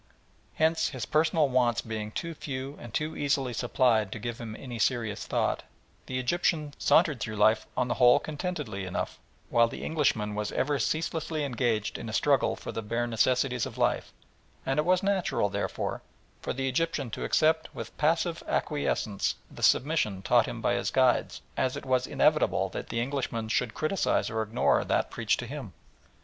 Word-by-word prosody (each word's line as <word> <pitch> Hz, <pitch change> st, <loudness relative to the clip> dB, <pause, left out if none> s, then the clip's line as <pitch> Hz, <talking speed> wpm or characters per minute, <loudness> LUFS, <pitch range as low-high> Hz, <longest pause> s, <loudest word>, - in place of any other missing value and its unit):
Hence 160 Hz, 0 st, +2 dB
his 130 Hz, -5 st, -5 dB
personal 155 Hz, -1 st, +3 dB
wants 125 Hz, -2 st, +2 dB
being 110 Hz, -1 st, -4 dB
too 165 Hz, +9 st, -4 dB
few 135 Hz, -2 st, -5 dB
and 120 Hz, -, -9 dB
too 150 Hz, +7 st, -2 dB
easily 140 Hz, -3 st, 0 dB
supplied 115 Hz, -3 st, +2 dB
to -, -, -4 dB
give 120 Hz, +2 st, -5 dB
him 110 Hz, -2 st, -6 dB
any 120 Hz, -1 st, -7 dB
serious 115 Hz, -3 st, 0 dB
thought, -, -, 0 dB, 0.5 s
the 130 Hz, -, -3 dB
Egyptian 150 Hz, +2 st, 0 dB
sauntered 155 Hz, -6 st, +4 dB
through 110 Hz, 0 st, -4 dB
life 110 Hz, +1 st, +3 dB
on 125 Hz, -1 st, +2 dB
the 120 Hz, -, 0 dB
whole 125 Hz, -1 st, +6 dB
contentedly 150 Hz, -, -4 dB
enough, 95 Hz, -, -4 dB, 0.3 s
while 115 Hz, 0 st, +5 dB
the -, -, -7 dB
Englishman 120 Hz, -9 st, 0 dB
was 105 Hz, 0 st, -2 dB
ever 145 Hz, +1 st, 0 dB
ceaselessly 160 Hz, -1 st, -1 dB
engaged 120 Hz, -5 st, -1 dB
in -, -, -6 dB
a -, -, -6 dB
struggle -, -, +2 dB
for -, -, -7 dB
the 115 Hz, -, -4 dB
bare 115 Hz, +3 st, -1 dB
necessaries 125 Hz, +2 st, +1 dB
of 125 Hz, -2 st, -10 dB
life; 120 Hz, -1 st, 0 dB, 0.5 s
and 135 Hz, +2 st, +1 dB
it 150 Hz, -, +1 dB
was 180 Hz, +1 st, +3 dB
as -, -, -16 dB
natural, 195 Hz, -, +1 dB
therefore, 100 Hz, +1 st, -3 dB, 0.4 s
for -, -, -3 dB
the 135 Hz, +1 st, -2 dB
Egyptian 140 Hz, -2 st, -1 dB
to -, -, -4 dB
accept 160 Hz, 0 st, +2 dB
with -, -, -7 dB
passive 165 Hz, +2 st, +1 dB
acquiescence 130 Hz, -8 st, -1 dB, 0.2 s
the -, -, -11 dB
submission 115 Hz, -10 st, +2 dB
taught 120 Hz, +1 st, +4 dB
him 115 Hz, -, -5 dB
by -, -, +2 dB
his 120 Hz, -, 0 dB
guides, 130 Hz, -2 st, +2 dB
as 130 Hz, -1 st, 0 dB
it -, -, -7 dB
was 130 Hz, -1 st, +1 dB
inevitable -, -, +2 dB
that -, -, -6 dB
the 115 Hz, -, -1 dB
Englishman 120 Hz, -3 st, -2 dB
should 115 Hz, +1 st, 0 dB
criticise 155 Hz, -, 0 dB
or 110 Hz, -1 st, -1 dB
ignore 110 Hz, +3 st, +2 dB
that -, -, 0 dB
preached 115 Hz, -2 st, 0 dB
to 120 Hz, -, -4 dB
him. 130 Hz, -, -7 dB
125 Hz, 180 wpm, -28 LUFS, 115-150 Hz, 0.5 s, whole